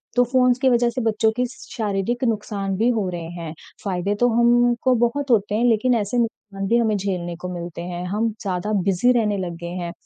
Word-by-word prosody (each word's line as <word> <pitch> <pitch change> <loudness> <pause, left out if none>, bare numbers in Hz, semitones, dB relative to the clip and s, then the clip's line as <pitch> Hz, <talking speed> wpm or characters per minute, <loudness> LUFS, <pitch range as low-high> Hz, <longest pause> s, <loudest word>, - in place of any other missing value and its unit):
तो 245 - +5
फ़ोन्स 250 0 +3
के 265 0 +3
वजह 240 -1 +3
से 250 +2 -3
बच्चों 220 -1 +2
के 250 - +2
शारीरिक 240 -5 -3
नुकसान 205 -4 -1
भी 225 +4 +2
हो 220 -5 0
रहे 170 -2 -5
हैं। 165 -2 -6 0.3
फायदे 195 +1 -1
तो 245 - +4
हमको 240 +2 +3
बहुत 265 +3 0
होते 210 -2 +2
हैं 230 +3 +2
लेकिन 240 +1 +3
ऐसे 215 +1 -1
नुकसान 210 -4 -3
भी 235 - +3
हमें 220 -3 +2
झेलने 180 -3 -3
को 180 - -4
मिलते 170 -1 -6
हैं, 175 0 -5
हम 215 +5 0
ज़्यादा 195 +1 -2
बिज़ी 195 +6 +3
रहने 210 -2 0
लग 180 -3 -4
गए 170 - -4
हैं। 170 - -4
215 Hz, 210 wpm, -22 LUFS, 190-240 Hz, 0.3 s, तो